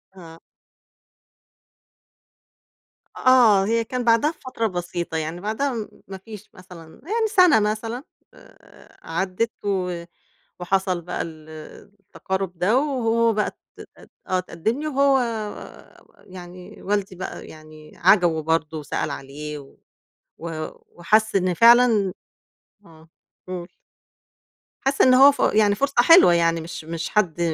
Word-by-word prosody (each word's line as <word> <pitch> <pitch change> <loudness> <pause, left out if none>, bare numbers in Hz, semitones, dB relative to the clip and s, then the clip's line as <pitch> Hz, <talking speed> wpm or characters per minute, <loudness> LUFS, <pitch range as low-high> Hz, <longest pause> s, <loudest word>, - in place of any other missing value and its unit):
آه. 165 -2 -13 2.8
آه، 235 -7 +5
هي 230 +1 0
كان 250 +2 -4
بعدَها 235 +6 +3
بفترة 255 -7 -4
بسيطة، 175 -3 -4
يعني 160 +3 -5
بعدها 235 +6 -2
م 220 -2 -5 0.2
ما 195 0 -8
فيش 210 +1 -12
مثلًا 175 -3 -15
يعني 440 +5 -1
سَنة 365 - +5
مثلًا، 225 +5 -3 0.3
آآ، - - -20
عدِّت 190 +7 -2
و 180 -3 -2 0.6
وحصَل 185 -1 -1
بقى 175 - -5
ال 155 -1 -9 0.5
التقارُب 190 -1 -5
ده 210 +8 +2
وهو 230 -5 +1
بقى 210 0 0
ت - - -38 0.5
أت - - -18 0.2
آه، 185 - +1
اتقدِّم 185 - -3
لي 310 - -3
وهو 275 -1 +3 1.1
يعني 180 -1 -12
والدي 200 -2 -2
بقى 185 - -8
يعني 155 -1 -14
عجَبه 175 -3 +3
برضه 160 -1 -1
وسأل 145 0 -4
عليه 145 +2 -7
و 135 - -16 0.6
و 170 +1 -7 0.5
وحس 215 +5 +1
إن 185 -1 +1
فعلًا 230 -2 +5 0.7
آه، 160 0 -18 0.4
قُل. 180 -1 -6 1.1
حَس 270 +1 0
إن 255 - +6
هو 275 +2 +8
ف 280 - -11
يعني 210 -1 +3
فرصة 275 +5 -1
حلوة 330 - +7
يعني، 165 -1 +1
مش 165 -1 -8
مش 165 0 -5
حد 180 -6 0
190 Hz, 125 wpm, -22 LUFS, 170-230 Hz, 2.8 s, هو